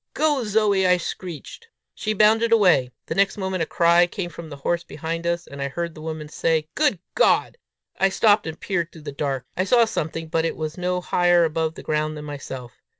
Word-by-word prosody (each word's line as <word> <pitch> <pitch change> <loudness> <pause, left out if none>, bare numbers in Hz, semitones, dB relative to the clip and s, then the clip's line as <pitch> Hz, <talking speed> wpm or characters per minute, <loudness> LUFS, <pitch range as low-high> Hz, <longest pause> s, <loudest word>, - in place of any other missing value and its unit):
"Go, 295 -4 +2
Zoe!" 210 -3 +2
I 180 0 +5
shrieked. 180 - -7 0.3
She 215 - -2
bounded 220 +2 +4
away. 180 - +4 0.2
The - - -3
next 195 +2 +2
moment, 190 -2 -2
a 160 - 0
cry 170 +1 +4
came 175 0 -5
from 165 -2 -9
the 145 - -7
horse 170 +5 -1
behind 165 +2 -5
us, 170 0 -1
and 140 0 -9
I 140 - -1
heard 170 +4 -4
the 155 - -11
woman 155 -1 -5
say 160 0 0
"Good 295 -9 +2 0.2
God!" - - +2 0.4
I 195 - +4
stopped, 205 0 +3
and 160 0 -6
peered 170 -4 -2
through 160 - -13
the 145 - -5
dark. 135 -3 -3
I 185 - +1
saw 235 +4 +4
something, 165 -5 -3
but 160 +1 0
it 165 - -2
was 155 0 -4
no 180 0 -1
higher 175 -1 +3
above 160 0 -1
the - - -10
ground 155 0 -1
than 150 - -7
myself. 135 -4 -8
170 Hz, 210 wpm, -23 LUFS, 155-195 Hz, 0.4 s, I